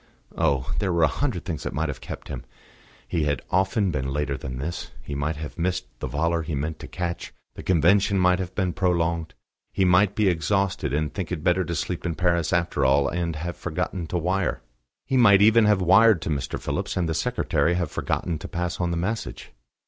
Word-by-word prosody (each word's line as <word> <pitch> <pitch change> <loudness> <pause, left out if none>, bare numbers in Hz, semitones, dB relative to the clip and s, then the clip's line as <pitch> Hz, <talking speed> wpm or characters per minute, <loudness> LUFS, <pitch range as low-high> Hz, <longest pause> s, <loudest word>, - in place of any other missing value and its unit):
Oh! 65 -2 +1
there 95 - 0
were 85 -1 +2
a - - +6
hundred 125 - -2
things 85 -5 -4
that - - -4
might 80 +2 0
have 70 -3 -5
kept - - -8
him. - - -6 0.6
He 80 -3 0
had 70 -3 -1
often 95 +1 +2
been 65 -3 -2
later 75 0 -1
than 65 -1 -6
this: 75 +6 -4
he 70 - -6
might 70 +3 -1
have 75 +2 -7
missed 90 +2 0
the - - -3
volor 85 +3 0
he 75 -1 -3
meant 75 +3 -3
to - - -8
catch; 85 -1 -4 0.2
the - - -8
Convention 95 +4 +3
might 90 0 +3
have 90 0 -5
been 95 -3 0
prolonged; 85 -2 0 0.4
he 95 - +1
might 95 +2 +4
be 105 -2 +2
exhausted, 95 0 0
and 75 +1 -1
think 95 -4 -4
it 80 -4 -3
better 90 +1 +3
to 85 - -3
sleep 90 +2 -3
in 85 -2 -2
Paris 85 -2 +1
after 85 -5 +1
all, 70 +1 +4
and 85 -2 -2
have 85 +2 -4
forgotten 85 -3 -3
to 90 - -2
wire. 90 -6 -1 0.4
He 135 - +1
might 100 -5 +7
even 110 +1 +6
have 105 -3 +3
wired 110 +2 +6
to 80 - -2
Mr. 70 -2 -2
Phillips, - - -3
and 90 -2 +1
the 80 - -1
secretary 85 +2 +1
have 85 -4 -1
forgotten 85 -4 -2
to - - -7
pass 90 0 -3
on 90 - +1
the 85 - -1
message. 105 +7 -4
85 Hz, 215 wpm, -25 LUFS, 75-95 Hz, 0.6 s, might